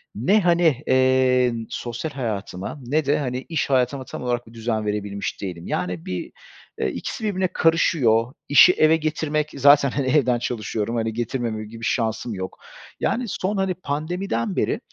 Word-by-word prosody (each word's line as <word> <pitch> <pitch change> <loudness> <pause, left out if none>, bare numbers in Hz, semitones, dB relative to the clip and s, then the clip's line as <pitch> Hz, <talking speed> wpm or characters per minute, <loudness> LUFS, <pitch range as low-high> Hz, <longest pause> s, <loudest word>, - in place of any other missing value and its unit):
ne, 195 - +3
hani, 170 -6 +3
eee, 130 -1 +3 0.2
sosyal 120 +6 -4
hayatıma 105 -2 -4
ne 145 +4 0
de, 145 +2 +2
hani, 125 -2 -3
iş 160 -4 -1
hayatıma 130 0 +1
tam - - -7
olarak 120 -1 -2
bir 115 - -15
düzen 110 -1 -2
verebilmiş 105 -1 -3
değilim. 90 -4 -6
Yani, 90 -2 -3
bir, 90 -1 -4 0.5
eee, - - +1
ikisi - - -5
birbirine 190 -3 0
karışıyor. 130 -7 +3 0.2
İşi 145 +6 +8
eve 155 -1 +4
getirmek 155 -1 -1
zaten 140 0 +6
hani 135 0 -1
evden 130 -3 +3
çalışıyorum, 115 -1 -3
hani, 115 -1 -1
getirmemem 115 -2 -3
gibi 115 0 -10
şansım 115 -1 -1
yok. 95 -1 -6 0.4
Yani, 250 +2 0
son, 195 0 -2
hani, 190 -1 +1
pandemiden 155 - -3
beri, - - 0
125 Hz, 155 wpm, -23 LUFS, 115-155 Hz, 0.5 s, İşi